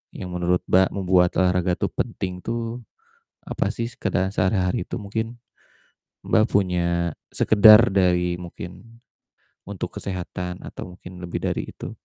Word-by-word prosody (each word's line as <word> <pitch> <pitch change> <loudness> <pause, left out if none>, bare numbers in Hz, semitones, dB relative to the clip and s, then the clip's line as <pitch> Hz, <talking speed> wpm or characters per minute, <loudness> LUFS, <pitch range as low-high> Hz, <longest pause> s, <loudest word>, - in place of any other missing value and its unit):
yang 90 - -6
menurut 90 0 0
Mbak 95 +1 +5
membuat 90 -2 +3
olahraga 90 -1 +2
tuh - - -2
penting 90 -1 -3
tuh, 115 +3 -4 0.7
apasih 115 0 -2
sekedar 100 -6 -1
sehari-hari 95 -2 +1
itu, - - -5
mungkin 110 +3 -4 0.9
Mbak 110 - +4
punya 85 -3 +1 0.2
sekedar 110 +2 +7
dari 90 -2 +2
mungkin 90 +6 -10 0.7
untuk - - -6
kesehatan 90 -1 -5
atau 90 - -8
mungkin 90 0 -12
lebih 90 -1 -5
dari - - -2
itu? - - -7
90 Hz, 125 wpm, -23 LUFS, 90-105 Hz, 0.9 s, sekedar